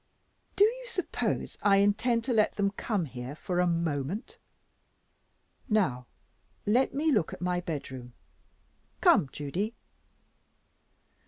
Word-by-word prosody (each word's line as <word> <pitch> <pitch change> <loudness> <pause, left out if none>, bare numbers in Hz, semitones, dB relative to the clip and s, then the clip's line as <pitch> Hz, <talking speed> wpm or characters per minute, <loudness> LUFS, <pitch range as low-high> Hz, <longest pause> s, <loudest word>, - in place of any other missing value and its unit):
"Do 400 - +6
you - - -2
suppose 430 -7 -2
I 200 -1 +5
intend 225 +4 +2
to 255 - 0
let 215 -2 +3
them 200 -1 +1
come 205 -3 -1
here, 125 0 -7
for 180 +2 -2
a 180 - +3
moment? 165 - -2 1.3
Now 135 - +1 0.6
let 245 +6 +3
me 310 +2 +2
look 205 - +1
at - - -8
my 180 0 0
bedroom. 130 -7 -6 0.9
Come, 135 - +5
Judy." 185 +11 -3
195 Hz, 115 wpm, -29 LUFS, 150-225 Hz, 1.3 s, Do